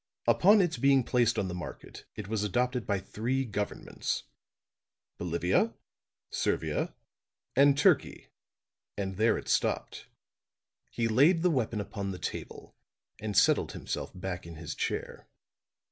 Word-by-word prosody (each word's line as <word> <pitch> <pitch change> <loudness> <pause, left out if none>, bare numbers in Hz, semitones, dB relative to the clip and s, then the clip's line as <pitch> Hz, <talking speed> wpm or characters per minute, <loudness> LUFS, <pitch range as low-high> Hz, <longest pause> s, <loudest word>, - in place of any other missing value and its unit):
Upon 205 +3 +6
its 175 -3 0
being 135 -1 +4
placed 120 -1 +2
on 95 - 0
the 90 - -4
market 90 -1 -8
it 105 - -6
was 110 -1 -1
adopted 125 +4 0
by 100 - +1
three 120 +8 -2
governments 105 -2 -3 1.0
Bolivia, 90 +6 +1 0.6
Servia, - - -1 0.6
and 140 +1 +6
Turkey 145 - +2 0.7
and 95 -2 -3
there 110 +1 +3
it - - -8
stopped." - - -1 0.8
He 115 -1 -1
laid 150 +10 +4
the 180 - +4
weapon 115 -6 0
upon 100 -1 -4
the 95 - -4
table - - -6 0.4
and 105 -2 -3
settled - - +4
himself - - -4
back 90 -1 -5
in 85 - -9
his 80 0 -6
chair. - - -4
110 Hz, 130 wpm, -30 LUFS, 95-130 Hz, 1.0 s, Upon